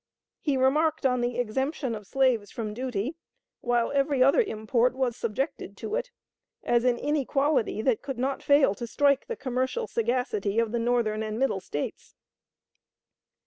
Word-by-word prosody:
He 285 Hz, -4 st, 0 dB
remarked 300 Hz, +4 st, +2 dB
on 250 Hz, -2 st, +2 dB
the 240 Hz, 0 st, -1 dB
exemption 265 Hz, +3 st, -1 dB
of 210 Hz, -3 st, -7 dB
slaves 255 Hz, -6 st, +2 dB
from 215 Hz, -3 st, -5 dB
duty, 250 Hz, -, -3 dB, 0.4 s
while 240 Hz, -2 st, +1 dB
every 275 Hz, -1 st, +2 dB
other 275 Hz, -, +5 dB
import 235 Hz, -, 0 dB
was 255 Hz, -3 st, 0 dB
subjected 230 Hz, -3 st, -3 dB
to 420 Hz, -, -6 dB
it, -, -, -1 dB, 0.5 s
as 240 Hz, 0 st, +2 dB
an 245 Hz, -1 st, +3 dB
inequality 280 Hz, -5 st, 0 dB
that 245 Hz, -3 st, +2 dB
could 270 Hz, -3 st, -5 dB
not 265 Hz, +2 st, -1 dB
fail 285 Hz, -7 st, +4 dB
to 235 Hz, +4 st, -6 dB
strike 280 Hz, +2 st, +2 dB
the 470 Hz, -, -3 dB
commercial 260 Hz, -, -2 dB
sagacity 230 Hz, -, -1 dB
of 230 Hz, -2 st, +2 dB
the 235 Hz, -, 0 dB
Northern 230 Hz, -2 st, +1 dB
and 215 Hz, 0 st, -3 dB
Middle 260 Hz, -6 st, +1 dB
States." 145 Hz, -5 st, -6 dB
250 Hz, 155 wpm, -27 LUFS, 230-275 Hz, 0.5 s, other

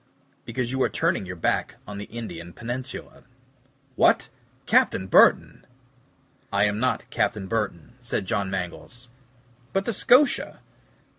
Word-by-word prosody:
"Because 125 Hz, -2 st, -3 dB
you 130 Hz, 0 st, -1 dB
are -, -, +3 dB
turning 95 Hz, -, 0 dB
your 90 Hz, -, -6 dB
back 85 Hz, -, -1 dB
on 100 Hz, 0 st, -7 dB
the 105 Hz, -, -6 dB
Indian 85 Hz, -7 st, -8 dB
peninsula." 125 Hz, +3 st, -7 dB, 0.7 s
"What! -, -, +3 dB, 0.4 s
Captain 95 Hz, -, +3 dB
Burton." 95 Hz, -, +4 dB, 0.9 s
"I 100 Hz, -, +2 dB
am 105 Hz, 0 st, +1 dB
not 130 Hz, +1 st, 0 dB
Captain 105 Hz, -4 st, 0 dB
Burton," 95 Hz, -5 st, -3 dB
said 115 Hz, -5 st, -3 dB
John 100 Hz, -1 st, -1 dB
Mangles. 95 Hz, +6 st, -6 dB, 0.6 s
"But 195 Hz, 0 st, 0 dB
the 235 Hz, -, -1 dB
SCOTIA." 250 Hz, +6 st, +3 dB
105 Hz, 130 wpm, -25 LUFS, 95-125 Hz, 0.9 s, Burton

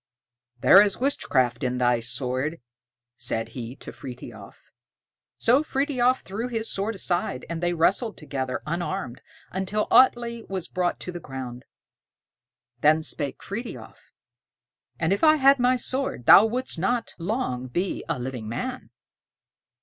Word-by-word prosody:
"There 195 Hz, -, +8 dB
is 205 Hz, -2 st, +2 dB
witchcraft 130 Hz, -, 0 dB
in 125 Hz, 0 st, -1 dB
thy 120 Hz, -1 st, +2 dB
sword," 130 Hz, +6 st, -2 dB, 0.6 s
said 115 Hz, -2 st, -1 dB
he 120 Hz, +1 st, -7 dB
to -, -, -10 dB
Frithiof. 120 Hz, -5 st, -11 dB, 0.7 s
So 250 Hz, +5 st, +4 dB
Frithiof 265 Hz, -4 st, +1 dB
threw 215 Hz, +6 st, -4 dB
his 225 Hz, -2 st, -3 dB
sword 205 Hz, +3 st, -2 dB
aside, 175 Hz, -9 st, -2 dB
and 170 Hz, 0 st, -4 dB
they 175 Hz, 0 st, +1 dB
wrestled 195 Hz, +7 st, +1 dB
together, 130 Hz, -4 st, -4 dB
unarmed, 170 Hz, -5 st, -3 dB, 0.3 s
until 190 Hz, +3 st, -1 dB
Atlé 235 Hz, -2 st, +3 dB
was 190 Hz, -3 st, -3 dB
brought 180 Hz, -1 st, -1 dB
to 180 Hz, -, -5 dB
the 175 Hz, -, -6 dB
ground. 130 Hz, -4 st, -7 dB, 1.1 s
Then 155 Hz, +1 st, +4 dB
spake 145 Hz, -4 st, -3 dB
Frithiof: 230 Hz, +5 st, -8 dB, 0.9 s
"And 165 Hz, +3 st, +2 dB
if 200 Hz, -, -3 dB
I 310 Hz, -1 st, +7 dB
had 275 Hz, -2 st, +5 dB
my 250 Hz, +1 st, +3 dB
sword 260 Hz, -, -2 dB
thou 210 Hz, -, +9 dB
wouldst 250 Hz, -5 st, -3 dB
not 230 Hz, +7 st, -1 dB
long 170 Hz, -, -2 dB
be 175 Hz, +9 st, -2 dB
a -, -, 0 dB
living 125 Hz, -3 st, -5 dB
man." 255 Hz, -, -5 dB
175 Hz, 135 wpm, -25 LUFS, -, 1.1 s, thou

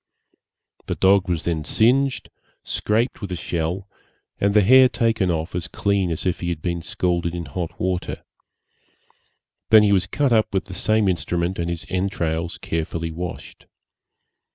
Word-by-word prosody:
The -, -, -2 dB
dog 95 Hz, 0 st, +3 dB
was 85 Hz, -2 st, -1 dB
then 80 Hz, -3 st, -1 dB
singed, 125 Hz, -, +1 dB, 0.3 s
scraped 115 Hz, +4 st, -1 dB
with 100 Hz, -3 st, -5 dB
a -, -, -1 dB
shell, 85 Hz, +3 st, -3 dB, 0.5 s
and 100 Hz, +1 st, +1 dB
the 105 Hz, -, +6 dB
hair 130 Hz, +5 st, +7 dB
taken 115 Hz, -7 st, +1 dB
off 80 Hz, 0 st, -2 dB
as 90 Hz, 0 st, -3 dB
clean 100 Hz, 0 st, 0 dB
as 80 Hz, +2 st, -3 dB
if 90 Hz, -, 0 dB
he 85 Hz, -, -3 dB
had 85 Hz, -3 st, -4 dB
been 85 Hz, -1 st, -2 dB
scalded 85 Hz, 0 st, -1 dB
in 85 Hz, -1 st, -4 dB
hot 80 Hz, +4 st, -5 dB
water. 90 Hz, -1 st, -2 dB, 1.5 s
He 105 Hz, -2 st, +7 dB
was 95 Hz, -1 st, +2 dB
then -, -, -39 dB
cut 140 Hz, -4 st, +2 dB
up 110 Hz, -1 st, +2 dB
with 95 Hz, -, 0 dB
the 95 Hz, -, -9 dB
same 110 Hz, +3 st, +1 dB
instrument, 90 Hz, 0 st, -1 dB
and 85 Hz, 0 st, -1 dB
his 85 Hz, -1 st, -4 dB
entrails 85 Hz, -3 st, -2 dB
carefully 80 Hz, 0 st, -3 dB
washed. 85 Hz, +1 st, -7 dB
90 Hz, 160 wpm, -22 LUFS, 85-100 Hz, 1.5 s, hair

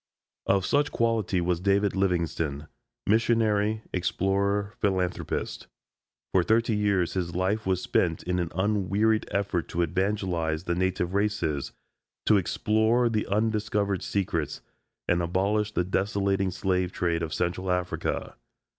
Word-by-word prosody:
Of 95 Hz, -1 st, +3 dB
such 145 Hz, +1 st, +2 dB
quality 115 Hz, -6 st, +1 dB
was 85 Hz, 0 st, 0 dB
David 100 Hz, +2 st, +2 dB
Livingstone 85 Hz, -6 st, -1 dB, 0.4 s
Missionary, 110 Hz, -1 st, +2 dB
Explorer, 100 Hz, +3 st, 0 dB
Philanthropist. 95 Hz, -3 st, -1 dB, 0.6 s
"For 95 Hz, -, +4 dB
thirty 110 Hz, +4 st, +2 dB
years 100 Hz, -4 st, +1 dB
his 85 Hz, -3 st, -2 dB
life 95 Hz, +4 st, 0 dB
was 95 Hz, -1 st, +1 dB
spent 85 Hz, -3 st, +1 dB
in 90 Hz, 0 st, -1 dB
an 85 Hz, -2 st, -2 dB
unwearied 105 Hz, +2 st, +1 dB
effort 100 Hz, -4 st, -1 dB
to 85 Hz, -, 0 dB
evangelize 90 Hz, -3 st, -1 dB
the 85 Hz, -, -1 dB
native 90 Hz, 0 st, -1 dB
races, 100 Hz, -9 st, -1 dB, 0.5 s
to 105 Hz, -, +5 dB
explore 110 Hz, +5 st, +2 dB
the 110 Hz, -2 st, -1 dB
undiscovered 105 Hz, -2 st, 0 dB
secrets, 85 Hz, -7 st, -2 dB, 0.5 s
and 90 Hz, 0 st, +2 dB
abolish 100 Hz, +5 st, 0 dB
the 90 Hz, -, +1 dB
desolating 95 Hz, 0 st, 0 dB
slave 90 Hz, -1 st, 0 dB
trade 85 Hz, -2 st, -1 dB
of 80 Hz, -2 st, -3 dB
Central 90 Hz, +3 st, -2 dB
Africa." 90 Hz, 0 st, -2 dB
95 Hz, 125 wpm, -27 LUFS, 90-105 Hz, 0.6 s, to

